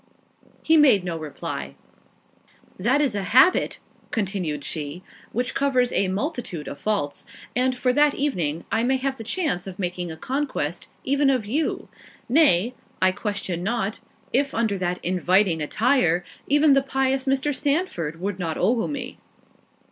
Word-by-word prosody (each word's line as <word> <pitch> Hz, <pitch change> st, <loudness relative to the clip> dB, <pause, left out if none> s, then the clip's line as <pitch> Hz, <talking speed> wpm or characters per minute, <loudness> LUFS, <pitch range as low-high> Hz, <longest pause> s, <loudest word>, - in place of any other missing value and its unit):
He 320 Hz, 0 st, +5 dB
made 265 Hz, -11 st, +6 dB
no 175 Hz, -2 st, -3 dB
reply. 70 Hz, -, -6 dB, 1.0 s
"That 255 Hz, +9 st, +3 dB
is 275 Hz, -6 st, +2 dB
a 205 Hz, -, -1 dB
habit," 255 Hz, -, +4 dB, 0.3 s
continued 185 Hz, -, -2 dB
she, 155 Hz, +4 st, -5 dB, 0.3 s
"which 245 Hz, +2 st, -1 dB
covers 255 Hz, -3 st, +2 dB
a 195 Hz, -, +2 dB
multitude 195 Hz, -, -3 dB
of -, -, -7 dB
faults—and, 215 Hz, -, -2 dB
for 250 Hz, 0 st, +1 dB
that 295 Hz, +1 st, +4 dB
evening, 170 Hz, -, -1 dB
I 225 Hz, +2 st, +2 dB
may 265 Hz, +2 st, +2 dB
have 265 Hz, 0 st, -2 dB
the 225 Hz, -, -7 dB
chance 230 Hz, -, -1 dB
of 185 Hz, -1 st, -7 dB
making 180 Hz, -2 st, -3 dB
a 160 Hz, -, -8 dB
conquest 255 Hz, -, -3 dB, 0.2 s
even 280 Hz, +1 st, +2 dB
of 255 Hz, -5 st, +1 dB
you—nay, 255 Hz, -, 0 dB, 0.3 s
I 185 Hz, 0 st, +4 dB
question 195 Hz, -3 st, -3 dB
not, 210 Hz, +1 st, -2 dB, 0.3 s
if 275 Hz, +2 st, +1 dB
under 225 Hz, -3 st, +1 dB
that 180 Hz, 0 st, -1 dB
inviting 180 Hz, -1 st, +2 dB
attire, 180 Hz, -, +2 dB, 0.2 s
even 290 Hz, +1 st, +5 dB
the 275 Hz, -, +5 dB
pious 270 Hz, 0 st, 0 dB
Mr. 275 Hz, +2 st, +1 dB
Sandford 280 Hz, -, -1 dB
would 195 Hz, +1 st, -3 dB
not 165 Hz, -3 st, -2 dB
ogle 225 Hz, +5 st, +1 dB
me." 265 Hz, -4 st, -5 dB
225 Hz, 145 wpm, -24 LUFS, 180-270 Hz, 1.0 s, made